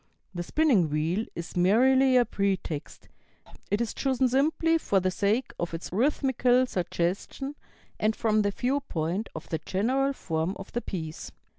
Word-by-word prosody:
The 175 - -3
spinning 220 - +2
wheel 160 +8 -1
is 170 0 -7
merely 255 +8 +4
a 245 - +5
pretext; 190 -7 -3 0.6
it 205 +3 +1
is 235 - -2
chosen 265 -1 +1
simply 315 +5 +2
for 200 -10 +2
the 185 0 0
sake 210 +7 0
of 170 -1 -2
its 165 - -7
rhythmical 255 +1 +2
suggestion 185 - -2 0.5
and 215 +1 +1
from 215 -1 +2
the 205 - +1
viewpoint 215 - -2
of 160 - -7
the 160 - -1
general 255 - 0
form 165 -4 -2
of 195 - -10
the 240 - -2
piece." 160 -7 -6
210 Hz, 150 wpm, -27 LUFS, 175-260 Hz, 0.6 s, a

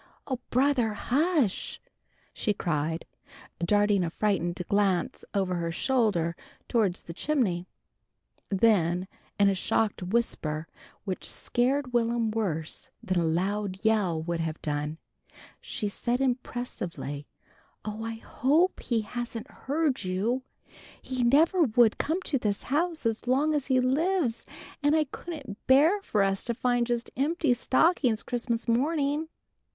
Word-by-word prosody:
"Oh, 260 -3 -3
brother! 255 -4 +2
Hush!" 280 - 0 0.5
she 210 - -1
cried, 160 -2 -1 0.6
darting 205 +1 +3
a 170 - -1
frightened 175 -2 0
glance 200 -3 +1
over 190 -2 +1
her 170 -1 -1
shoulder 200 -6 +1 0.3
towards 205 -6 +1
the 170 - -8
chimney. 190 - 0 0.8
Then 185 -4 +3 0.3
in 200 - +6
a 200 - +4
shocked 205 +2 0
whisper 175 -6 -1 0.4
which 190 -3 -3
scared 255 +1 0
Will'm 235 -1 +1
worse 175 -8 -3
than 185 -1 +1
a - - +1
loud 190 +4 -1
yell 205 -7 +2
would 170 0 -2
have 160 -1 -3
done, 150 +1 -2 0.6
she 210 - -3
said 240 +4 -1
impressively, 240 - -3 0.6
"Oh, 215 +1 -4
I 225 0 -3
hope 300 +10 +1
he 235 -3 0
hasn't 240 +3 -5
heard 285 -3 -1
you! 200 +8 0 0.6
He 255 -1 -3
never 315 +9 +4
would 235 -5 +4
come 340 +5 -1
to 275 - 0
this 205 -3 -1
house 320 +2 -1
as 225 +1 -1
long 285 +5 +3
as 290 -3 -1
he 260 -2 +3
lives! 270 -1 +1 0.4
And 290 +1 +3
I 315 - +4
couldn't 280 - -8
bear 310 +10 +5
for 210 - +1
us 195 0 0
to 235 - -1
find 245 -1 +1
just 240 -1 -2
empty 295 0 +2
stockings 255 -2 +2
Christmas 235 -1 -2
morning." 290 +5 +1
230 Hz, 135 wpm, -28 LUFS, 190-265 Hz, 0.8 s, in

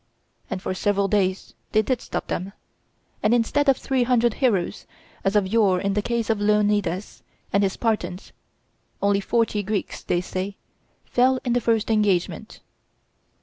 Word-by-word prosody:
And 185 - -4
for - - -2
several 200 +1 +1
days 190 -2 0 0.2
they 215 - +4
did 250 +2 -1
stop - - -4
them; 190 +3 -4 0.7
and 215 +3 +3
instead 275 +5 +2
of 270 - +4
three 265 -2 0
hundred 240 -2 +3
heroes, 215 -10 0 0.4
as 195 +2 0
of 205 -2 +4
yore 200 -3 +3
in 195 +1 -1
the 210 - +1
case 230 0 -1
of 215 -2 -1
Leonidas 205 -3 +1 0.3
and 200 - +4
his 195 -1 +1
Spartans, 195 -5 -2 0.7
only 200 0 +2
forty 220 0 0
Greeks, 205 +1 -3
they 175 - 0
say, 185 +2 -4 0.5
fell 255 +1 +2
in 240 - +1
the 245 - +2
first 225 -1 +1
engagement. 205 -5 0
210 Hz, 155 wpm, -24 LUFS, 195-230 Hz, 0.7 s, they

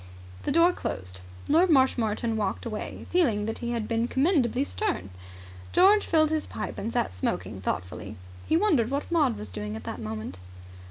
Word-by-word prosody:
The - - +1
door 335 +3 +5
closed. 90 - -5 0.3
Lord 340 +5 +4
Marshmoreton 235 -5 +2
walked 205 0 -2
away 215 -2 -5
feeling 240 -13 +2
that 225 - -3
he 235 - -3
had 230 -3 -2
been 230 0 0
commendably 265 - +2
stern. 385 - -2 0.6
George 400 +3 +5
filled 310 -1 +3
his 315 -1 -1
pipe - - -5
and 225 - -3
sat 240 - 0
smoking 90 +2 -3
thoughtfully. 95 +3 -4 0.3
He 320 - +3
wondered 315 - +3
what 280 +4 -3
Maud 295 -9 +2
was 105 - -7
doing 105 +3 -5
at 110 - -7
that - - -5
moment. 110 -4 -5
235 Hz, 170 wpm, -27 LUFS, -, 0.6 s, door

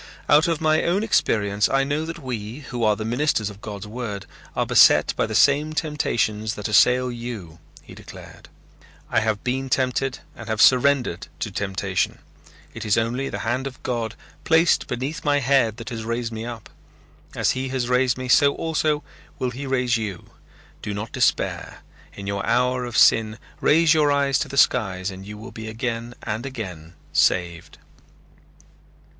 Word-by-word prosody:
"Out 150 +3 +5
of 165 -3 0
my 155 0 +2
own 185 +5 +1
experience 105 - +1
I 135 0 +2
know 145 +3 -1
that 165 +1 -6
we, 125 -3 -6
who 125 -3 -5
are 105 -1 +3
the 110 - -5
ministers 120 -3 0
of 100 +1 -15
God's 105 -1 -7
word, 105 -3 -6 0.3
are - - +1
beset - - +5
by - - 0
the - - -4
same 150 +2 +3
temptations 115 -9 -1
that 105 - -4
assail 125 +4 +4
you," 115 -9 -7 0.2
he - - -13
declared. - - -13 0.6
"I - - +3
have 110 -2 -1
been 130 +1 -2
tempted 130 0 0 0.2
and - - -10
have 110 -1 -2
surrendered 125 -7 +3
to 105 - -3
temptation. 95 -1 -2 0.6
It 115 - -7
is 105 -3 +2
only 120 +4 -1
the - - -4
hand 130 +4 -1
of 130 -1 -11
God, 115 -3 -3 0.3
placed 160 +1 +3
beneath 130 +6 -4
my 145 -1 +2
head, 130 -5 +2
that 115 -2 -7
has 115 -2 -5
raised 115 +1 -3
me 110 +1 -5
up. 115 -3 -8 0.6
As - - +2
he 130 +1 -3
has 130 -2 -2
raised 125 0 +2
me 130 0 -5
so 140 +2 +4
also 155 -2 0 0.3
will 125 -1 -2
he 135 +3 -6
raise 125 -2 +1
you. 105 -5 -6 0.5
Do 105 - -4
not 105 +2 -5
despair. - - -1 0.3
In 100 - -9
your 100 0 -2
hour 125 +2 +1
of 120 -2 -4
sin 110 -1 +4 0.2
raise 160 +1 +4
your 150 -2 +3
eyes 140 -1 +2
to 145 - -2
the 140 0 -7
skies 95 -6 +2
and 95 +1 -10
you 105 0 -8
will 110 +4 -10
be 110 -1 -8
again 115 +1 -4
and 110 0 -3
again 90 -11 -7 0.2
saved." 85 -2 +1
120 Hz, 175 wpm, -23 LUFS, 110-135 Hz, 0.6 s, Out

